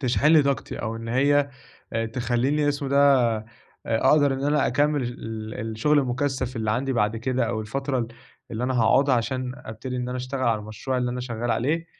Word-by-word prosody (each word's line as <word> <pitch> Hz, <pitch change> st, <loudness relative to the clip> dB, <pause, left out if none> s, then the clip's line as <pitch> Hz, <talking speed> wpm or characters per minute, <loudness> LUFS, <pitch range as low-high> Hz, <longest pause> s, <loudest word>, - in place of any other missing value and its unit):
تشحن 130 Hz, +1 st, +1 dB
لي 155 Hz, -1 st, +7 dB
طاقتي 140 Hz, -3 st, -2 dB
أو 115 Hz, 0 st, -3 dB
إن 115 Hz, 0 st, -7 dB
هي 140 Hz, +3 st, +2 dB, 0.6 s
تخلّيني- 130 Hz, +4 st, +1 dB
اسمه 140 Hz, -1 st, -1 dB
إيه 140 Hz, -, -1 dB
ده- 135 Hz, -5 st, +5 dB, 0.5 s
أقدر 135 Hz, +5 st, +3 dB
إن 135 Hz, +1 st, -3 dB
أنا 145 Hz, 0 st, +2 dB
أكمل 145 Hz, +2 st, +1 dB
ال 110 Hz, -3 st, -6 dB
ال 110 Hz, +1 st, -4 dB
الشغل 145 Hz, +8 st, +2 dB
المُكثف 130 Hz, -1 st, -1 dB
اللي 110 Hz, -1 st, -1 dB
عندي 130 Hz, +5 st, 0 dB
بعد 110 Hz, -2 st, +1 dB
كده، 130 Hz, +2 st, 0 dB
أو 110 Hz, -, -2 dB
الفترة 135 Hz, +5 st, -2 dB
ال 115 Hz, -2 st, -2 dB, 0.4 s
اللي 115 Hz, +2 st, -2 dB
أنا 130 Hz, +1 st, -1 dB
هاقعدها 135 Hz, +4 st, +4 dB
عشان 125 Hz, +1 st, -1 dB
أبتدي 125 Hz, +2 st, -7 dB
إن 125 Hz, 0 st, -3 dB
أنا 125 Hz, -, -3 dB
أشتغل 130 Hz, +1 st, -4 dB
على 115 Hz, -3 st, +2 dB
المشروع 110 Hz, +5 st, -4 dB
اللي 125 Hz, -1 st, -1 dB
أنا 125 Hz, +1 st, -4 dB
شغال 120 Hz, -1 st, -3 dB
عليه. 160 Hz, +9 st, 0 dB
130 Hz, 195 wpm, -25 LUFS, 115-140 Hz, 0.6 s, لي